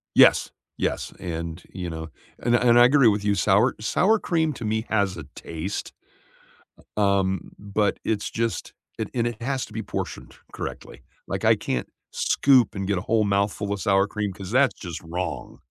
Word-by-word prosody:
Yes, - - +6 0.3
yes, - - -2
and, 85 0 -5
you 90 -2 -4
know, 80 0 -6 0.3
and 120 0 +2
and 120 0 +5
I 120 - +9
agree 135 0 +5
with 105 -1 +2
you, 105 0 +2
sour 100 +5 +3
sour 200 - +2
cream 160 -5 0
to 120 - -7
me 110 +1 -1
has 100 -4 +1
a 85 - -6
taste. 85 +5 -5 1.1
U - - +3
um, 95 -2 +1
but 105 0 0
it's 105 -2 -1
just, 115 0 -2 0.2
it 110 - -2
and 120 -2 +1
it 120 -2 -4
has 135 +1 -1
to - - -16
be 110 0 -4
portioned - - -5 0.2
correctly. - - -7 0.3
Like, - - -3
I - - +7
can't 60 -2 -3 0.2
scoop 130 -6 +3
and 95 -1 -3
get 100 -1 +1
a - - -2
whole 110 +3 +1
mouthful 100 0 0
of 100 - -3
sour 95 0 +3
cream, 105 -1 -3
'cause 95 0 -8
that's 130 +2 +4
just 85 -5 -6
wrong. 80 -4 -5
105 Hz, 185 wpm, -25 LUFS, 95-115 Hz, 1.1 s, I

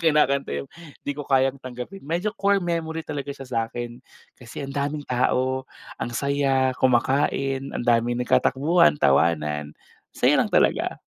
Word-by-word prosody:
kinakanta 150 -4 +2
'yong, 70 - -4 0.4
"Di 145 - -1
Ko 145 - -7
Kayang 135 0 +2
Tanggapin." 130 +10 -8
Medyo 175 +8 -2
core 200 -4 +1
memory 165 -1 -2
talaga 145 -3 -5
siya 140 -1 -6
sa'kin, 120 0 -4 0.4
kasi 125 +3 -7
ang 135 - -7
daming 145 +1 -2
tao, 130 +1 0 0.3
ang 115 - -2
saya, 135 -2 +1
kumakain, 135 +1 +2 0.2
ang - - -3
daming 120 +1 +2
nagkatakbuhan, 150 +8 +3
tawanan, 75 - +1 0.4
masaya - - +4
lang - - 0
talaga. - - +2
135 Hz, 140 wpm, -24 LUFS, 125-150 Hz, 0.4 s, masaya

